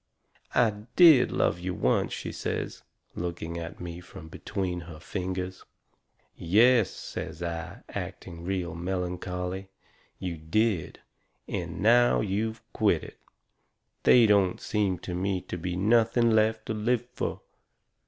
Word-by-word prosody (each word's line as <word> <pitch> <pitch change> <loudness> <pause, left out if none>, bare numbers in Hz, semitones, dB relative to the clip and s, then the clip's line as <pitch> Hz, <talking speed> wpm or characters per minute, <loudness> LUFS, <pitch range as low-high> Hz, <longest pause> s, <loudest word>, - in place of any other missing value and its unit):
"I 115 -3 +5 0.2
DID 160 -8 +8
love 85 - +1
you 90 0 -3
once," - - +1
she - - -4
says, - - -4 0.3
looking 85 -1 -4
at 85 0 -7
me 85 -1 -6
from 90 -2 -11
between 90 +1 -3
her 75 -2 -9
fingers. 95 +1 -4 0.7
"Yes," 110 +5 +4
says 85 - -6
I, 85 -1 -5
acting 85 -1 -7
real 90 -1 -2
melancholy, 90 +1 -3 0.5
"you 90 -3 -4
did. 95 +2 0 0.5
And 85 +1 -4
now 120 +3 +5
you've 110 +2 -2
quit - - +2
it, - - -11 0.8
they 120 -2 +7
don't 100 -4 +3
seem 100 -4 0
to 90 - -4
me 95 +1 0
to - - -6
be 90 +1 -3
nothing 115 +4 +3
left 110 0 +2
to - - -2
live 115 +3 0
fur." - - -2
95 Hz, 130 wpm, -28 LUFS, 90-110 Hz, 0.8 s, DID